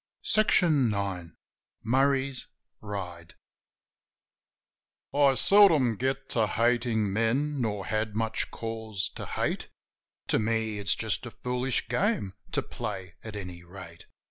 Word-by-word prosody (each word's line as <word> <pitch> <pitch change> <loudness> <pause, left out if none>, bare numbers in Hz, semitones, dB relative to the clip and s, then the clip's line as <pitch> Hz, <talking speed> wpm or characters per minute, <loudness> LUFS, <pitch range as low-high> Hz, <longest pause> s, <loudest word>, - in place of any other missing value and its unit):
MURRAY'S 215 -1 +5 0.4
RIDE 90 -4 -4 0.6
Murray's 135 +2 +1 0.3
Ride 90 -5 -6 1.8
I 140 -1 +4
SELDOM 160 - +5
get 135 +2 -1
to 110 -3 +2
hatin' 115 -2 +1
men, 130 +7 +1
nor 105 -4 -2
had 110 -1 -1
much 110 0 -1
cause 110 -4 -4
to - - -8
hate; - - -2 0.6
To - - +3
me, 110 -1 0
it's 95 -2 +3
just 110 +2 -1
a - - -5
fooHsh 125 +2 -1
game 200 - 0 0.2
to - - 0
play, 90 -2 -6
at 110 -1 -7
any 90 -3 -7
rate. 85 -1 -12
110 Hz, 115 wpm, -28 LUFS, 100-130 Hz, 1.8 s, MURRAY'S